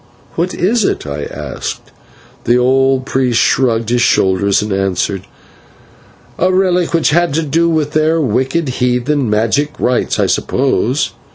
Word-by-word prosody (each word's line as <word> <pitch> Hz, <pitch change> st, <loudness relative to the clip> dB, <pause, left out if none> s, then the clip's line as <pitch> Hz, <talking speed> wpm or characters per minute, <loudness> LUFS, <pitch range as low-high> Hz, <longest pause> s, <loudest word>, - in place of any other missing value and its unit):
"What 175 Hz, +2 st, -2 dB
is 220 Hz, +5 st, +1 dB
it?" -, -, -1 dB
I 70 Hz, 0 st, -5 dB
asked. -, -, -7 dB, 0.5 s
The 120 Hz, +1 st, +3 dB
old 130 Hz, +1 st, +2 dB
priest 130 Hz, -3 st, 0 dB
shrugged 115 Hz, -4 st, +1 dB
his 120 Hz, 0 st, +1 dB
shoulders, 100 Hz, -1 st, +2 dB
and 105 Hz, -1 st, -3 dB
answered: 95 Hz, 0 st, -2 dB, 1.1 s
"A 185 Hz, +2 st, +2 dB
relic 180 Hz, -2 st, +1 dB
which 165 Hz, -2 st, +2 dB
had 170 Hz, -2 st, +1 dB
to 165 Hz, -, +1 dB
do 165 Hz, +3 st, +1 dB
with 155 Hz, -3 st, 0 dB
their 155 Hz, +1 st, +1 dB
wicked 135 Hz, +4 st, 0 dB
heathen 125 Hz, +1 st, 0 dB
magic 115 Hz, +8 st, 0 dB
and -, -, -2 dB
rites, 125 Hz, 0 st, 0 dB
I -, -, +2 dB
suppose. -, -, 0 dB
130 Hz, 150 wpm, -15 LUFS, 115-165 Hz, 1.1 s, The